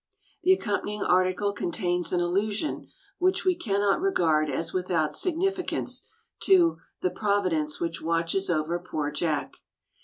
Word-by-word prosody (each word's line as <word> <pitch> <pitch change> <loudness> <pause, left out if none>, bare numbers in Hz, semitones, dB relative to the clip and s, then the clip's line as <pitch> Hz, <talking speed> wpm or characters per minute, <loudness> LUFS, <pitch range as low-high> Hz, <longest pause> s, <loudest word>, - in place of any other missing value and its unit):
The 370 - +4
accompanying 210 - -2
article 185 +2 +2
contains 175 -2 -1
an 180 - +1
allusion, 205 - -1 0.3
which 370 +2 +1
we 370 - +4
cannot 205 - 0
regard 160 - +2
as 165 +4 -2
without 170 -4 0
significance, 365 - -1 0.3
to 355 -4 +4
" - - -49
the 370 - +1
Providence 185 -8 0
which 165 -1 -3
watches 165 +4 0
over 165 +1 0
poor 155 -4 -3
Jack." 150 0 -2
185 Hz, 130 wpm, -27 LUFS, 165-220 Hz, 0.3 s, The